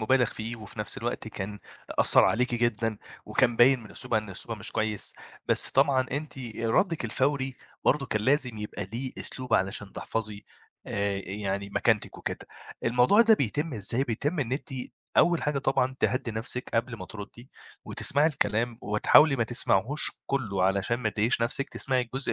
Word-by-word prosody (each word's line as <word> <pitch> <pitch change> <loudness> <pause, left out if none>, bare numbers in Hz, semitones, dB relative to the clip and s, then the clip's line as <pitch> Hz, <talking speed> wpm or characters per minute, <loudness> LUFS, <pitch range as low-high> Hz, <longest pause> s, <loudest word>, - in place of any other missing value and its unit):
مبالَغ 125 +3 +3
فيه، 115 +2 -5
وفي 110 0 -12
نفْس 105 - -3
الوقت 120 -1 -4
كان 105 -1 -6 0.4
أثّر - - +6
عليكِ 125 +1 +1
جدًا، 115 -2 0 0.3
وكان 120 -1 +2
باين 130 +1 +6
من 105 - -13
أسلوبها 110 - -1
إن 105 -2 -7
أسلوبها 110 +4 -6
مش - - -3
كويس. 110 -2 -1 0.3
بس - - +4
طبعًا 135 -1 +3
أنتِ 145 0 -4 0.2
ردِّك 140 - +1
الفوري 130 +2 0 0.3
برضه 140 -1 +2
كان 105 - -1
لازم 130 -2 +1
يبقى 105 -1 -5
ليه 125 +3 -4
أسلوب 130 -1 -2
علشان 100 +1 -1
تحفَظي 110 -2 -4 0.4
آآ، 100 -1 -1
يعني 100 0 -3
مكانتِك 110 +1 0
وكده. - - -5 0.4
الموضوع 125 - +4
ده 225 -1 +6
بيتم 145 - -2
إزاي، 115 +5 0
بيتم 145 +7 -2
إن 125 -3 -2
أنتِ 135 - -3 0.5
أول 170 -1 +4
حاجة 150 -1 0
طبعًا 135 -1 0
تهدِّي 130 -2 0
نفْسِك 115 +3 -2
قبل 115 +1 0
ما - - -7
ترُدّي، 110 +4 -10 0.3
وتسمَعي 145 +2 +1
الكلام، 115 -5 0
وتحاولي 135 +7 +5
ما 115 - +1
تسمَعيهوش 120 +3 +3 0.2
كلّه 110 -9 -1
علشان 95 +4 +1
ما 110 - 0
تضايقيش 110 +3 +1
نفْسِك، 120 +4 0
تسمَعي 130 -1 0
الجزء 130 +3 -1
120 Hz, 165 wpm, -27 LUFS, 105-135 Hz, 0.5 s, أثّر